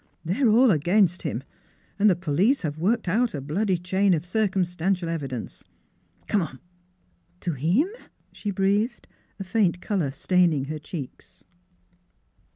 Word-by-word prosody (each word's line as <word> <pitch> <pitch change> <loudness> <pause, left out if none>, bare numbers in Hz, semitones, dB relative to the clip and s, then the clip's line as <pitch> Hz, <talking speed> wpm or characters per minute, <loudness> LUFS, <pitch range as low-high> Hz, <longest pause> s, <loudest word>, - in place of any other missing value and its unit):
they're 225 - +2
all 235 +2 +6
against 175 +3 +2
him, 135 -5 -3 0.6
and 210 +1 +6
the 185 - +4
police 185 - +1
have 155 -1 -3
worked 210 +5 +1
out 220 +2 +1
a - - -3
bloody 180 +8 0
chain 190 +2 +2
of 160 +1 -4
cir 215 +4 +1
cumstantial 180 -1 -1
evidence. 135 -8 -5 0.6
Come 205 - +2
on! 135 -6 -6 0.3
" 90 - -41
" 85 - -39
To 175 - -1
'imf 195 - 0
" - - -41
she. 210 - -5
breathed, 200 +5 0 0.3
a - - -3
faint 190 -3 +1
color 185 -8 -1
staining 160 0 +2
her 155 +2 -5
cheeks. 150 -2 -9
180 Hz, 155 wpm, -25 LUFS, 155-205 Hz, 0.6 s, all